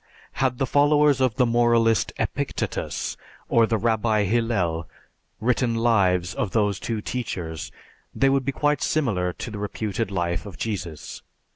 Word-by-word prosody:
Had 130 -2 0
the 135 - +1
followers 145 0 +4
of 130 -4 +2
the 125 -1 +3
moralist 115 -1 +3
Epictetus - - -3 0.3
or 115 -1 +4
the 115 - +1
Rabbi 110 -1 +1
Hillel 100 -7 0 0.5
written 120 +1 +1
lives 95 -6 +2
of 95 - -3
these 105 -3 +1
two 115 -2 -3
teachers 90 - -4 0.4
they 135 - +2
would 135 0 +2
be 140 - -1
quite 145 +1 0
similar 105 -13 0
to 115 - -7
the 105 - -6
reputed 105 +1 -3
life 85 -1 -2
of 100 - -10
Jesus. 90 -9 -5
115 Hz, 145 wpm, -24 LUFS, 95-125 Hz, 0.5 s, followers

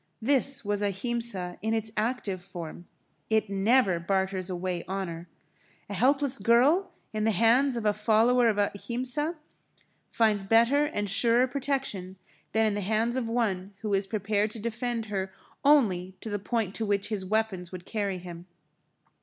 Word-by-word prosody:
This 270 0 +2
was 205 0 -1
Ahimsa 200 -2 -1
in 220 +1 0
its 220 0 -1
active 215 -4 -2
form. 175 -1 -9 0.4
It 220 -2 +1
never 195 -2 +3
barters 190 +1 -1
away 180 -1 -3
honour. 175 -3 -4 0.6
A - - -3
helpless 275 0 +2
girl 285 +11 +4 0.2
in 215 0 -1
the 220 - +3
hands 235 +6 +3
of 225 - -4
a 210 - +3
follower 225 +3 +3
of 215 -2 +1
Ahimsa 250 - -1 0.7
finds 215 -3 +2
better 235 +8 +4
and 205 -9 -2
surer 235 +5 +4
protection 260 -9 -3 0.3
than 220 0 +2
in 215 - +1
the 205 - -2
hands 220 +4 0
of 245 -3 -2
one 200 -5 -1
who 210 -2 -1
is 195 0 +1
prepared 210 0 0
to 220 - -7
defend 235 +1 -3
her 195 -3 -3 0.3
only 195 -11 +3
to 220 - -6
the 205 - -2
point 210 -1 -2
to 225 - -3
which 205 0 0
his 210 -4 -3
weapons 190 -3 -1
would 180 -1 -8
carry 200 -4 -2
him. 175 -1 -10
215 Hz, 160 wpm, -28 LUFS, 195-235 Hz, 0.7 s, girl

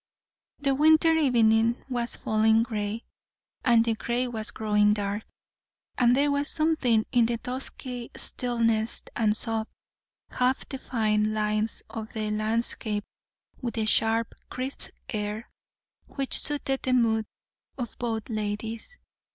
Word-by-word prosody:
The 275 -1 +1
winter 315 +3 +5
evening 235 -6 +3
was 240 -2 -1
falling 220 +1 +3
grey, 220 -1 -3 0.6
and 235 -2 +5
the 230 - +2
grey 240 +3 -1
was 225 -2 -3
growing 210 -2 +3
dark; 205 +1 -2 0.7
and 245 -1 +4
there 285 +2 +3
was 285 +1 0
something 295 -9 +2
in 240 -3 +4
the 235 0 -1
dusky 250 0 -5
stillness, 230 -2 0
and 215 -2 +2
soft, 225 -1 -2 0.6
half 255 +1 +1
defined 215 -5 0
lines 215 +1 0
of 220 -1 -6
the 215 -1 -2
landscape, 215 -1 -1 0.6
with 240 -3 -3
the 220 -2 0
sharp, 225 +1 +2 0.2
crisp 260 +2 -2 0.2
air, 210 +1 -3 0.6
which 275 -2 -2
suited 280 -2 0
the 255 - 0
mood 225 -3 +2 0.5
of 240 -4 -5
both 225 -3 -2
ladies. 220 - -3
230 Hz, 125 wpm, -27 LUFS, 215-250 Hz, 0.7 s, winter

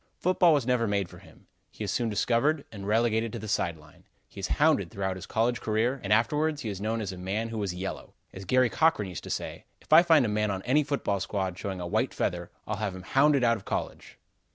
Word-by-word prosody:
Football 180 -1 +3
was 145 -6 +2
never 125 -2 +1
made 100 -2 0
for - - -13
him. - - -19 0.2
He - - -8
is - - -2
soon 120 -2 0
discovered 125 +8 +1
and 100 -2 -8
relegated 115 +1 +1
to - - -3
the 110 0 -7
side 85 -5 0
line. 75 0 -19 0.2
He - - -12
is 95 - -2
hounded 145 - +3
throughout 95 0 -3
his 95 - -9
college 120 +2 0
career, 115 +5 0
and 100 - -3
afterwards 150 +7 +2
he 110 - -3
is 100 -1 -5
known 110 +2 -1
as 100 - -3
a 90 - -8
man 100 +5 -2
who 115 -1 -4
was 100 -4 -2
yellow. 95 +2 -6 0.2
As 95 - -8
Garry 130 +5 +3
Cochran 155 -12 +2
used 90 - -7
to - - -8
say: - - -4
"If - - -3
I 160 - +10
find 160 -6 +4
any 105 - -1
man 105 0 +1
on 95 -1 -3
my 140 +5 +3
football 140 -9 -1
squad 95 -1 -2
showing 95 0 -5
a 90 - -4
white 85 - -1
feather, - - -2 0.2
I'll 110 - -3
have 100 -2 -3
him 95 - -9
hounded 135 +6 +3
out 115 -1 +3
of 95 - -14
college." - - -5
110 Hz, 245 wpm, -28 LUFS, 95-130 Hz, 0.2 s, I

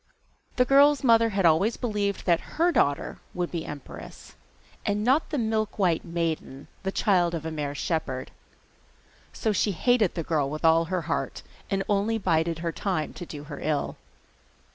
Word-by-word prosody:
The 250 - +3
girl's 280 +2 +5
mother 230 -2 +5
had 195 -3 0
always 170 +8 +3
believed 205 -4 -2
that 170 -2 0
her 340 +2 +4
daughter 145 - +1 0.2
would 180 -1 -2
be 165 -2 -4
empress, 145 -2 -9 0.5
and 205 +1 0
not 265 +7 +2
the 300 - -2
'Milkwhite 215 -7 0
Maiden,' 165 -5 -3
the 190 - -2
child 175 -4 +2
of 160 -1 -5
a 160 - -3
mere 145 -2 -3
shepherd. 145 -5 -2 1.0
So 220 - -1
she 205 0 +1
hated 225 +1 +2
the 165 - -2
girl 150 -4 0
with 155 +3 -4
all 165 +1 +5
her 180 0 -2
heart, - - -3 0.3
and 195 -1 0
only 205 +2 +1
bided 165 -4 +1
her 165 - 0
time 180 -4 -2
to 175 - -8
do 145 -2 -8
her 150 -1 -8
ill. 150 -2 -1
180 Hz, 165 wpm, -26 LUFS, 160-215 Hz, 1.0 s, girl's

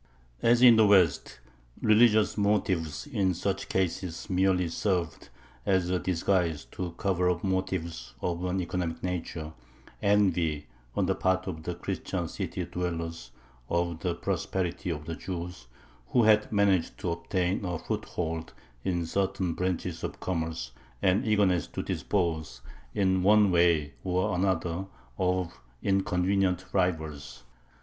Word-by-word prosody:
As 120 +1 +4
in 120 -3 +9
the 110 -1 +6
West, 90 -10 +3 0.4
religious 110 0 +5
motives 95 -7 0
in 100 - 0
such 100 +2 -2
cases 90 0 -2
merely 90 -1 +2
served 85 0 -2 0.3
as 90 +1 +1
a 90 - +1
disguise 85 -3 0
to 90 -2 -4
cover 90 -3 +1
up 90 -1 -1
motives 95 -8 -2
of 85 0 -2
an 90 +1 0
economic 85 -1 -3
nature 85 -3 -4 0.5
envy 90 -7 +2 0.3
on - - +2
the - - +2
part 95 0 +1
of 80 - -5
the 85 +2 -4
Christian - - -3
city 90 - -4
dwellers 85 -6 -4 0.4
of 85 -1 0
the 85 0 -1
prosperity 90 +1 -2
of 75 -2 -3
the 85 - -4
Jews, 90 -5 -6 0.4
who 120 - +3
had 105 -1 +4
managed 100 -5 +2
to 85 - -1
obtain 90 +3 -1
a 90 -3 -2
foothold 80 0 -4 0.3
in 85 -2 0
certain 95 0 -1
branches 90 -1 -2
of - - -4
commerce, 80 -8 -3 0.3
and 95 +5 +3
eagerness 100 -6 +3
to - - -5
dispose 85 -6 -1 0.3
in 95 -2 +2
one 105 +1 +5
way 85 -4 +3
or 90 +3 0
another 90 0 0 0.3
of 90 -8 -1 0.2
inconvenient 95 -1 +1
rivals. 80 -8 -1
90 Hz, 130 wpm, -28 LUFS, 85-95 Hz, 0.5 s, in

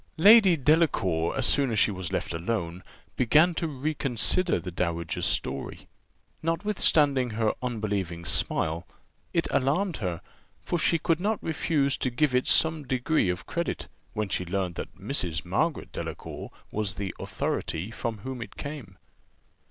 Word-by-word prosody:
Lady 195 0 +8
Delacour, 130 - +2
as 130 - +3
soon 140 0 +3
as 110 - -1
she 110 - +4
was 95 -3 -5
left - - -2
alone, 85 0 -2 0.4
began 155 +8 +5
to 165 - -2
reconsider 145 - 0
the 90 +2 -6
dowager's 85 -2 -1
story; 70 +1 -3 0.5
notwithstanding 160 -7 +2
her 110 0 +1
unbelieving 100 -8 -2
smile, 80 +2 0 0.4
it - - +1
alarmed 155 +7 +1
her, 90 -6 -3 0.4
for 175 - -1
she 165 - +3
could 165 +1 +1
not 210 +3 0
refuse 150 -3 +1
to 130 - 0
give 130 +3 +1
it 125 0 +2
some 160 -1 +3
degree 130 - +1
of 90 +1 -3
credit, 170 -1 -3 0.3
when 105 -1 -1
she 90 - -1
learnt 90 -1 -2
that 80 - -7
Mrs. 90 - -1
Margaret 110 - -1
Delacour - - -6 0.2
was 105 -2 -2
the 100 -2 -4
authority 90 +7 -3
from 115 -1 -3
whom 130 +1 -5
it - - -8
came. 140 -10 -7
120 Hz, 145 wpm, -27 LUFS, -, 0.5 s, Lady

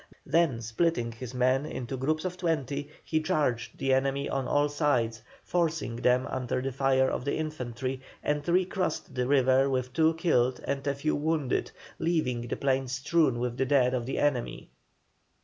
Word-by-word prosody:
Then 165 -9 +2
splitting 115 +1 0
his 125 +2 -8
men 130 +2 +2
into 130 -3 -5
groups 155 +6 -1
of 180 -1 -2
twenty, 145 -5 -2
he 160 -1 0
charged 140 -6 -1
the 135 -1 +1
enemy 135 +1 +1
on 135 -2 -2
all 145 +2 +3
sides, 125 -7 0 0.2
forcing 165 -9 -1
them 125 +1 +2
under 130 -1 -2
the 135 +1 -2
fire 130 0 +2
of - - -2
the 140 - -1
infantry, 130 -4 -4 0.2
and 150 +2 -1
recrossed 185 -4 0
the 125 -1 -1
river 135 0 +4
with 130 -1 -1
two 160 +1 +3
killed 130 -7 +2
and 140 0 -2
a 140 - +1
few 145 +3 0
wounded, 150 -3 0 0.3
leaving 125 -8 0
the - - -3
plain 135 -1 +1
strewn 135 +1 +1
with 120 0 -2
the 135 - +1
dead 130 -2 +3
of 120 -2 -2
the 135 - -2
enemy. 145 -5 -1
135 Hz, 170 wpm, -28 LUFS, 125-155 Hz, 0.3 s, river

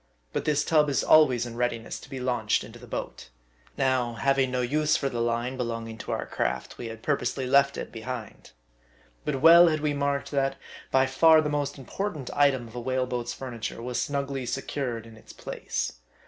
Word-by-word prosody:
But - - -2
this 150 -1 +1
tub 150 -2 +3
is 140 - +1
always 130 -6 +5
in 120 -1 -7
readiness 120 -1 -2
to - - -14
be 135 - -6
launched 120 -4 0
into - - -11
the - - -13
boat. - - -6 0.5
Now, 130 -3 +1
having 135 +1 +2
no 125 0 -1
use 150 +5 +2
for 135 - -1
the 120 -2 -3
line 120 +2 -1
belonging 115 -2 -4
to - - -5
our - - -2
craft, - - -3
we 120 - -5
had 115 0 -9
purposely 135 -2 -1
left 140 +2 +4
it - - -5
behind. 115 -1 -7 0.8
But 135 -3 -1
well 170 +2 +9
had~we 155 -2 +1
marked 140 0 -1
that 135 -1 +1 0.3
by 135 0 +4
far 160 +4 +6
the 155 -1 0
most 145 -1 -2
important 150 +1 -4
item 140 -4 +3
of 115 - -14
a 120 - -4
whale 130 +1 0
boat's 120 -1 -3
furniture 120 -5 -6
was 125 0 -2
snugly 140 -2 -2
secured 125 -4 -3
in 115 -1 -13
its - - -14
place. - - -4
130 Hz, 190 wpm, -27 LUFS, 120-140 Hz, 0.8 s, well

